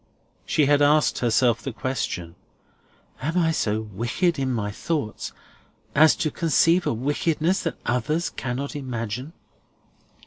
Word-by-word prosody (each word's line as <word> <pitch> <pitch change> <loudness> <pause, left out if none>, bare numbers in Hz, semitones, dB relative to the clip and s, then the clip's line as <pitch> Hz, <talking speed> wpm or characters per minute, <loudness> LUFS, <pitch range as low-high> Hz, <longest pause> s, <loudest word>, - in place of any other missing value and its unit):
She 150 - +3
had 145 +1 +4
asked 150 +1 +4
herself 120 -1 +2
the 135 - -4
question, 115 -9 -3 0.9
"Am 160 +6 -1
I 165 -2 +3
so 110 -8 0
wicked 120 - -1
in 130 -1 0
my 105 -4 -2
thoughts 140 0 -3 0.6
as 155 +2 +6
to 155 - -1
conceive 165 +3 +3
a - - +2
wickedness 155 - 0
that 165 - -3
others 150 +8 0
cannot 135 +4 -4
imagine?" 125 +1 -4
135 Hz, 130 wpm, -24 LUFS, 120-155 Hz, 0.9 s, as